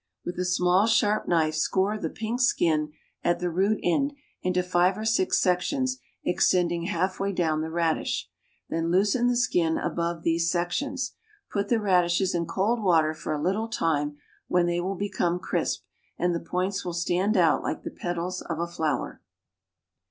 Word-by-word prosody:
With 175 - -4
a 180 - 0
small, 180 +3 +3
sharp 215 -2 +2
knife 160 -3 +2
score 190 +6 +1
the 215 - -3
pink 225 +3 -3
skin, 155 -10 +2 0.3
at 175 0 +2
the 175 0 -2
root 195 +5 +1
end, 275 +12 +1 0.3
into 180 0 +1
five 180 +1 +2
or 215 - -4
six 220 -4 +2
sections 255 +9 0 0.3
extending 175 -1 +2
half 190 -1 -1
way 200 0 0
down 160 -4 0
the 160 - -3
radish; 165 -1 -1 0.4
then 165 0 -1
loosen 205 +7 +3
the 245 0 +2
skin 170 -9 +2
above 170 -1 -2
these 165 0 +1
sections. 255 +11 -1 0.4
Put 200 0 -1
the 235 - +3
radishes 185 -2 +2
in 170 -1 -1
cold 210 +7 0
water 160 -5 +3
for 155 0 -6
a 150 - -1
little 205 +5 0
time, 150 -8 -1 0.3
when 180 -1 +2
they 175 0 0
will 190 +2 -2
become 185 -3 0
crisp, - - -2 0.3
and 175 0 +1
the 170 - -1
points 185 +3 -2
will 175 - -4
stand 180 +5 +1
out 165 -4 +4
like - - -3
the - - -5
petals 175 +1 -3
of 165 - -2
a 170 - -1
flower. 160 -6 -2
180 Hz, 175 wpm, -26 LUFS, 170-200 Hz, 0.4 s, out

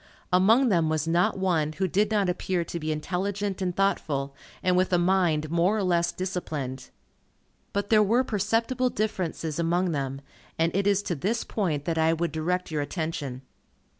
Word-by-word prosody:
Among 225 +8 +5
them 170 -5 +2
was 155 0 -1
not 170 +3 +2
one, 165 -5 +1
who 190 +4 -1
did 205 +3 +1
not 205 -3 +1
appear 180 0 -1
to 170 - -5
be 155 0 -2
intelligent 190 +5 -2
and 180 -2 -1
thoughtful, 150 -8 0 0.3
and 185 -1 +3
with 185 +1 +2
a 180 - +4
mind 175 -4 +2
more 175 +5 +2
or 205 - 0
less 170 -2 +2
disciplined. 150 -8 -4 0.8
But 200 +1 -2
there 215 -1 +6
were 230 +5 +3
perceptible 230 +4 0
differences 175 -8 -2
among 175 +2 +1
them, 135 -2 -3 0.4
and 165 +1 +1
it 195 +1 +1
is 200 0 +2
to 175 - -2
this 195 - -1
point 160 -9 -2
that 165 -1 -1
I 160 +1 +3
would 170 0 -1
direct 175 +3 -2
your 150 -2 -1
attention. 145 -4 -4
180 Hz, 175 wpm, -26 LUFS, 160-195 Hz, 0.8 s, there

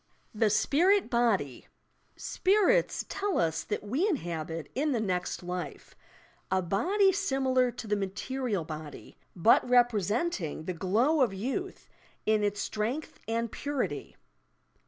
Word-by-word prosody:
THE 215 0 +2
SPIRIT 350 - +3
BODY 215 - +1 0.5
"Spirits" 420 +6 +2
tell 400 -1 -1
us 160 -1 +1
that 210 - -3
we 275 - 0
inhabit, 165 - -3
in 290 +2 0
the 235 - 0
next 185 -3 -2
life, 180 -3 -6 0.5
a 190 - +2
body 360 - +2
similar 265 -9 +1
to 245 - -7
the 210 -1 0
material 205 +1 -2
body, 155 -2 -9
— - - -42
bat 190 +6 +5
representing 240 - +1
the 185 - -2
glow 225 - +2
of 245 -6 +3
yonth 270 - -4 0.4
in 215 -1 +2
its 205 0 0
strength 235 +9 -3
and 230 0 -1
purity. 280 - -3
225 Hz, 130 wpm, -29 LUFS, 185-285 Hz, 0.5 s, bat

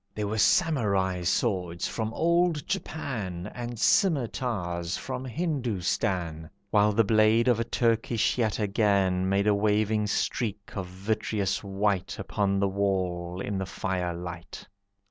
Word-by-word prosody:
There 105 - -2
were 110 +2 -2
Samurai 100 - +2
swords 90 -2 0
from 110 -1 -3
old 170 -2 +2
Japan, 105 - -4
And 120 -1 -5
scimitars 110 - +1
from 130 -1 -5
Hindoostan, 100 - -2 0.2
While 105 0 +4
the 115 +2 +4
blade 110 +2 +4
of 120 -3 +3
a - - +2
Turkish 115 -1 +1
yataghan 100 -4 +1
Made 100 +1 +2
a 105 - +4
waving 105 +1 +1
streak 105 -1 -2
of 95 -3 -3
vitreous 100 +1 -2
white 100 -1 -1
Upon 100 0 0
the 100 - +2
wall, 95 -2 -1
in 100 -1 -2
the 95 - -3
firelight. 90 -2 -4
100 Hz, 125 wpm, -27 LUFS, 95-115 Hz, 0.2 s, While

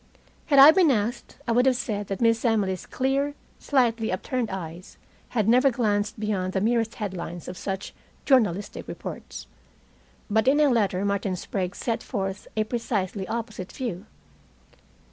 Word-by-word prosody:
Had 285 - +3
I 275 +3 +11
been 350 -2 +4
asked, 230 -2 -1
I - - +1
would 245 +3 +4
have 260 - +4
said 210 -5 -3
that 195 +2 -4
Miss 230 -1 +3
Emily's 205 -6 0
clear, 275 +2 0 0.2
slightly 235 -5 +1
upturned 235 +5 -2
eyes 175 -1 -7 0.3
had 215 -4 0
never 250 +4 +5
glanced 210 -3 0
beyond 195 -3 -1
the 190 - +1
merest 225 +2 +1
headlines 175 -5 -5
of 180 - -6
such 195 +1 -5 0.3
journalistic 205 - +1
reports. 65 - -7 0.8
But 220 +3 +1
in 285 +3 +5
a 300 -1 +5
letter 205 -5 +1
Martin 200 -1 0
Sprague 185 +1 -3
set 230 -2 -2
forth 195 -3 -4
a 215 - +3
precisely 210 -4 -2
opposite 220 -5 -5
view. 220 -6 -5
215 Hz, 150 wpm, -25 LUFS, 195-245 Hz, 0.8 s, I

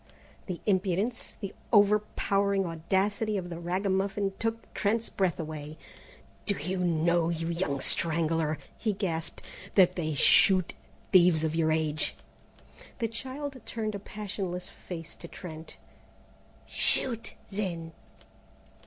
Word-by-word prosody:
The 180 -3 -4
impudence, 195 +3 0
the 200 -2 -4 0.2
overpowering 200 -2 +3
audacity 195 +6 0
of 175 -2 -5
the 170 - -5
ragamuffin 195 +2 0
took 225 0 -3
Trent's 220 +3 0
breath 185 -3 0
away. 155 -1 -6 0.7
"Do 200 - +3
you 185 +6 -2
know, 170 -1 +2
you 165 0 -2
young 170 -5 -1
strangler," 160 -1 +1 0.2
he 215 -2 0
gasped, 165 -5 -3 0.3
"that 180 -2 +6
they 155 -3 -1
shoot 185 +5 +6 0.4
thieves 175 -4 +6
of 160 -1 0
your 160 -1 +2
age?" 155 -1 +1 0.8
The 230 - 0
child 260 +4 -6
turned 215 -2 -3
a 200 - -4
passionless 195 -3 -5
face 165 -2 -8
to - - -9
Trent. 160 -3 -9 0.9
"Shoot, 230 -3 +1 0.2
then." 175 -5 -3
185 Hz, 120 wpm, -29 LUFS, 165-205 Hz, 0.9 s, that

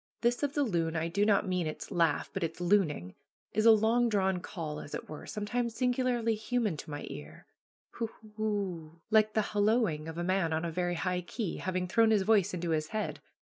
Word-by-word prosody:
This 240 +1 +2
of 285 -1 0
the 290 - +3
loon 170 -8 0
I 160 +1 0
do 200 +5 +1
not 205 -1 +3
mean 180 -3 0
its 155 - -6
laugh, 165 -4 +1
but 195 - -2
its 165 0 -3
looning 170 - +1 0.4
is 215 +1 +3
a - - +11
long 225 +2 +4
drawn 190 -3 +1
call, 160 -5 -5
as 145 - -7
it - - -6
were, 155 - -8
sometimes 230 +2 -2
singularly 250 -2 +1
human 220 -3 -1
to 150 - -8
my 145 -1 -5
ear 75 +1 -9 0.5
hoo 230 - -3
hoo 215 -1 -17
ooooo, 180 -7 -3
like 215 -1 +4
the 215 - +2
hallooing 205 -7 +2
of 160 0 -6
a 175 - -1
man 185 -3 +1
on 160 +2 -1
a 170 - -2
very 175 +1 -1
high 180 +1 -1
key, 185 +2 -4
having 185 -1 -2
thrown 225 +4 +4
his 210 -3 +3
voice 205 -3 +3
into 175 -2 -2
his 155 -1 0
head. 215 +3 -3
190 Hz, 210 wpm, -31 LUFS, 165-220 Hz, 0.5 s, a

